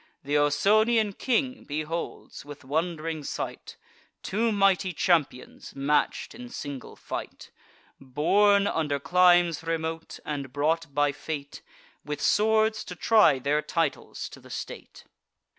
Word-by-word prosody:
Th' 145 - -3
Ausonian 205 +9 +3
king 255 +4 -1
beholds, 155 +3 -5
with 145 0 -11
wond'ring 160 +1 -2
sight, - - -6 0.5
Two 225 +4 0
mighty 195 -2 +2
champions 155 -7 -1
match'd 140 +2 0
in 245 +1 -10
single 145 - -7
fight, - - -7 0.5
Born 200 +10 +3
under 150 -7 -1
climes 175 0 +4
remote, 165 0 -3
and 140 -3 -4
brought 155 +2 0
by 145 0 +3
fate, 145 0 -6 0.4
With 150 0 -5
swords 220 +1 +2
to 180 - -7
try 190 -7 +4
their 145 +3 0
titles 165 +1 -2
to - - -12
the - - -16
state. - - -8
165 Hz, 120 wpm, -27 LUFS, 145-200 Hz, 0.5 s, climes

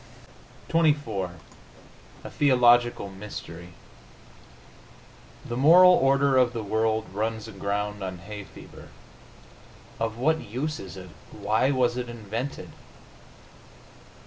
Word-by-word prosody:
XXIV 145 - 0 0.9
A - - -7
THEOLOGICAL 120 -5 +3
MYSTERY 90 -3 -10 1.7
The 120 - -5
moral 170 +8 +7
order 135 -3 +3
of 125 -1 +3
the 115 -2 -4
world 110 +1 0
runs 110 +2 -3
aground 105 0 -4
on 95 -1 -5
hay 105 +4 -9
fever. - - -14 1.1
Of 115 0 -2
what 160 +6 +1
use 145 +8 -4
is 95 -1 -9
it? 95 -2 -10 0.2
Why 110 +5 0
was 125 -3 +1
it 125 -1 -4
invented? 115 +4 -6
115 Hz, 100 wpm, -26 LUFS, 100-130 Hz, 1.7 s, moral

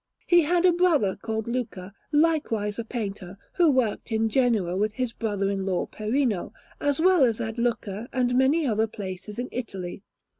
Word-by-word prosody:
He 345 -1 +5
had 345 +3 +2
a 360 - +6
brother 330 - +2
called 220 -1 -4
Luca, 220 -6 -4 0.2
likewise 290 -10 +1
a - - -1
painter, 200 -5 -5 0.2
who 345 -3 +4
worked 250 -4 0
in 225 0 +1
Genoa 220 -8 +1
with 210 +2 0
his 250 0 -2
brother 205 -4 -1
in 195 -1 -2
law 190 -2 0
Perino, 215 -3 -1 0.3
as 285 +1 0
well 360 -2 +5
as 230 -3 +2
at 225 0 -4
Lucca 230 -2 -2
and 250 -1 +1
many 270 +5 +3
other 220 -3 +1
places 200 0 -7
in 245 +1 -3
Italy. 195 -7 -5
230 Hz, 175 wpm, -26 LUFS, 205-265 Hz, 0.3 s, a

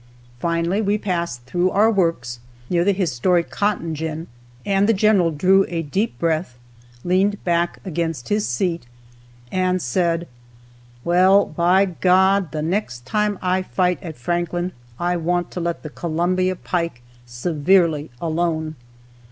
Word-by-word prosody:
Finally 170 - 0
we 205 0 +1
passed 170 - -3
through 175 +8 +1
our 210 +4 +4
works, 165 - 0 0.3
near 175 -1 +3
the 200 - +3
historic 175 -1 +1
"cotton 200 -6 -1
gin," 160 +1 -4 0.4
and 200 +1 +2
the 225 - +4
general 200 -4 +4
drew 185 +5 +4
a 165 -1 -2
deep 195 - -2
breath, 160 -6 -1 0.5
leaned 195 +3 +1
back 170 0 0
against 165 -7 -3
his 210 0 +1
seat, 165 +3 -1 0.6
and 185 0 +1
said: 170 +4 0 0.8
"Well, 185 +3 +5
by 175 +5 +3
God, 185 0 +2
the 155 -1 -3
next 155 - -2
time 210 +5 0
I 185 +1 +1
fight 180 -1 0
at 160 -4 -8
Franklin, 175 +6 -2 0.3
I 175 0 0
want 175 +1 -1
to - - -5
let 170 0 -3
the 155 - -7
Columbia 180 +3 0
pike 170 -9 -3 0.2
severely 155 +4 +1
alone!" 160 -2 -1
175 Hz, 135 wpm, -21 LUFS, 160-190 Hz, 0.8 s, Well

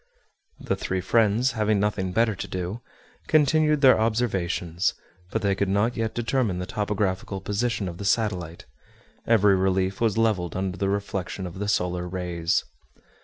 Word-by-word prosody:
The - - -1
three 95 - -2
friends, 115 +5 +2
having 110 -2 +1
nothing 100 -2 -1
better 110 +3 +2
to 100 0 -6
do, 95 +4 -4 0.5
continued 155 0 +3
their 130 -5 +6
observations; 95 -6 0 0.3
but 110 +2 -2
they 100 -1 +2
could 95 0 -1
not 105 +5 +1
yet 110 -1 -2
determine 120 -4 0
the 90 - -3
topographical 100 -1 -2
position 105 +1 -1
of 85 -1 -7
the 100 - -5
satellite; 95 -5 -1 0.6
every 105 -3 +5
relief 95 +1 0
was 115 -2 +2
leveled 105 -7 +1
under 95 -1 -2
the 100 +1 -1
reflection 100 -2 -3
of 90 +1 -7
the 105 - -2
solar 90 -2 0
rays. 85 -2 -1
100 Hz, 155 wpm, -25 LUFS, 95-110 Hz, 0.6 s, their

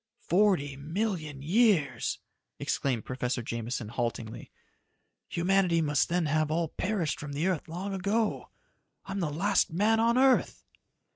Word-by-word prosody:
"Forty 175 -8 +2
million 155 -2 -3
years!" 190 -3 +2 0.4
exclaimed 125 -5 -1
Professor 125 -1 -2
Jameson 115 0 -4
haltingly. 115 -1 -4 0.8
"Humanity 180 -1 +2
must 145 -3 +1
then 175 -1 +1
have 155 0 +1
all 165 0 0
perished 185 -5 -2
from 145 -1 -6
the 150 +4 -1
earth 185 -5 -1
long 185 +5 -4
ago! 205 +3 -1 0.6
I'm 195 0 -4
the 170 -5 0
last 170 +7 +1
man 210 +6 +2
on 230 +2 +3
earth!" 265 0 +3
165 Hz, 130 wpm, -29 LUFS, 140-200 Hz, 0.8 s, on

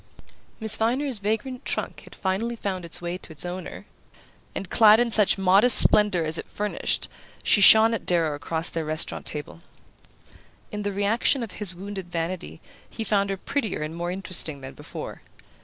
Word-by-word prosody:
Miss 220 -1 +6
Viner's 250 +2 -1
vagrant 220 +5 -3
trunk - - -3
had - - -15
finally 205 +5 -2
found 190 -5 -5
its 170 +1 -4
way 175 +1 -4
to 180 - -14
its 155 +1 -4
owner; 180 +1 -7 0.7
and, 195 - -5
clad 215 +3 +5
in 240 -1 +1
such 210 -3 +4
modest 195 +5 +6
splendour 205 -5 +4
as 155 +1 -1
it - - -8
furnished, 210 0 -2 0.4
she 205 - +3
shone 220 +3 +7
at 225 - -5
Darrow 165 -4 +1
across 160 +3 -3
their 165 - -4
restaurant 155 +1 -4
table. 145 - -7 1.1
In 210 - -5
the 205 0 -3
reaction 215 +6 +1
of 220 - -7
his 185 -3 -2
wounded 190 -1 -8
vanity 165 - -5 0.3
he 225 - -6
found 200 -2 0
her 195 - -3
prettier 220 - -3
and 155 +2 -6
more 175 +1 -4
interesting 180 -6 -2
than 130 0 -9
before. - - -9
195 Hz, 175 wpm, -24 LUFS, 170-220 Hz, 1.1 s, shone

